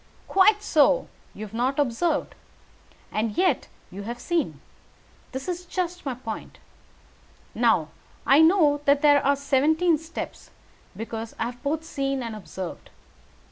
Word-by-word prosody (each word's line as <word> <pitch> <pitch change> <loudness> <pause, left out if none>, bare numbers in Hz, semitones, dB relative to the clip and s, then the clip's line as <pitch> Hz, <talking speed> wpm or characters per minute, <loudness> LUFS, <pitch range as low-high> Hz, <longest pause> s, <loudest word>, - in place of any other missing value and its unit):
"Quite 410 +2 +4
so! 370 +9 +3 0.3
You 215 - -6
have 210 - -13
not 250 +4 0
observed. 290 +3 0 0.8
And 215 0 -2
yet 370 0 +2 0.2
you 195 +2 -7
have 235 +4 -6
seen. 345 +2 -1 0.7
That 265 +3 -6
is 360 0 -3
just 360 -3 -3
my 260 - -2
point. 225 -3 -7 1.0
Now, - - +2 0.4
I 275 - +6
know 320 -4 +4
there 285 0 +5
are 280 +1 +3
seventeen 300 +4 +2
steps, 325 +2 -7 0.5
because 225 0 -6
I - - -1
have 245 +1 -6
both 300 +2 -1
seen 275 -4 -2
and 230 -2 -5
observed. 190 -3 -7
280 Hz, 135 wpm, -25 LUFS, 235-330 Hz, 1.0 s, I